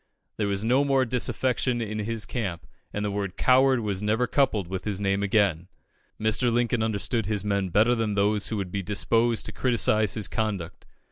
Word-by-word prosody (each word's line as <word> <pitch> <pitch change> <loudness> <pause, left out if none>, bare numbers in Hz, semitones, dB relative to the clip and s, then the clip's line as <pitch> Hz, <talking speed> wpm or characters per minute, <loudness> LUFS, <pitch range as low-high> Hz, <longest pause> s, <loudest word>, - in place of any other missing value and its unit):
There 105 - 0
was 100 0 -2
no 125 +5 +3
more 135 -2 +2
disaffection 125 0 0
in 110 -2 -3
his 110 +1 -2
camp, 95 -9 -4 0.3
and 105 0 -3
the 105 - -1
word 100 -2 -4
"coward" 130 -1 +4
was 100 -3 -2
never 110 +4 +1
coupled 115 -9 +1
with 95 +1 -5
his 100 -3 -2
name 100 0 0
again. 100 -5 +1 0.5
Mr. 110 +3 +1
Lincoln 120 0 +1
understood 110 0 -1
his 105 -2 -2
men 100 -2 0
better 110 +7 +3
than 110 -3 -1
those 100 0 +1
who 110 - -3
would 95 -3 -4
be 100 - -2
disposed 105 +5 0
to - - -5
criticise 110 -5 +1
his 105 -4 -2
conduct. 100 -6 -4
105 Hz, 190 wpm, -26 LUFS, 100-120 Hz, 0.5 s, coward